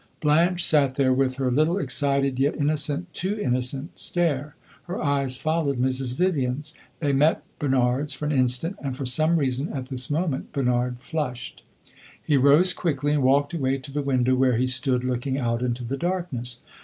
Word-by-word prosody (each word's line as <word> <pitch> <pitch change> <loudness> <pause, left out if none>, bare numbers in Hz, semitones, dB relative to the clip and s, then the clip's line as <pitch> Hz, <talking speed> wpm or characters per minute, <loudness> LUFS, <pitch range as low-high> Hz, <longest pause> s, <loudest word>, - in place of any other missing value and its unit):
Blanche 170 +4 +2
sat 140 -4 +3
there 130 -2 +3
with 130 0 +1
her 130 -1 -1
little 155 +7 +2
excited, 140 -3 +1
yet 140 +2 +2
innocent 150 +3 -1
too 200 +4 -2
innocent 130 0 -2
stare; 150 -5 -1 0.3
her 180 +2 -5
eyes 140 -3 +1
followed 155 -3 -1
Mrs. 130 0 -1
Vivian's. 150 -4 0 0.3
They 145 -3 +1
met 150 +4 +3 0.2
Bernard's 135 0 +1
for 150 - -4
an 150 - 0
instant, 130 +6 0
and 135 -3 -4
for 135 - -4
some 155 +7 +2
reason, 135 0 -1
at 130 -1 -5
this 130 -2 -3
moment, 155 -2 -2
Bernard 125 -2 0
flushed. 140 -5 -4 0.6
He 150 - 0
rose 145 +7 +5
quickly 145 -3 -1
and 150 - +1
walked 140 +4 +2
away 135 -4 0
to 135 +1 -10
the 145 +1 -2
window 130 -2 +1
where 130 -2 +3
he 125 - +2
stood 130 -1 +2
looking 130 +1 -2
out 115 -3 -1
into 125 0 -2
the 130 +4 -3
darkness. 170 -8 -3
140 Hz, 175 wpm, -24 LUFS, 130-150 Hz, 0.6 s, rose